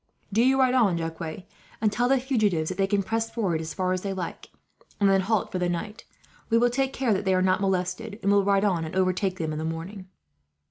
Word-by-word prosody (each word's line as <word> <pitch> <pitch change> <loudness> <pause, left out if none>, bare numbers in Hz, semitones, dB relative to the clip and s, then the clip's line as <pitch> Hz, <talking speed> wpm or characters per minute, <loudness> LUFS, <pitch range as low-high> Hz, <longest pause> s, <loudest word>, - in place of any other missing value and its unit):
"Do 220 - +3
you 265 +1 +3
ride 255 -1 +4
on, 215 -9 +3
Jacques, 165 +1 -5 0.3
and 215 -1 +2
tell 245 +4 +1
the 270 -1 +4
fugitives 215 - 0
that 185 - -5
they 195 - +3
can 200 0 +1
press 225 +3 -1
forward 180 -9 -1
as 160 -1 -6
far 185 -1 0
as 185 - -2
they 195 0 -3
like, 185 -3 -6 0.5
and 200 - +4
then 195 -1 +4
halt 210 +2 0
for 185 - -2
the 180 0 0
night. 205 +5 -5 0.4
We 230 - +4
will 240 +1 +3
take 270 +2 0
care 255 -5 0
that 195 - -1
they 190 -1 +2
are 185 - +2
not 185 +1 +2
molested, 195 +3 -1
and 200 - +3
will 200 0 +4
ride 200 +1 +2
on 180 -5 +1
and 160 +3 -6
overtake 185 0 +1
them, 160 -3 -2
in 155 - -4
the - - -3
morning." 170 +5 -5
195 Hz, 245 wpm, -26 LUFS, 180-220 Hz, 0.5 s, ride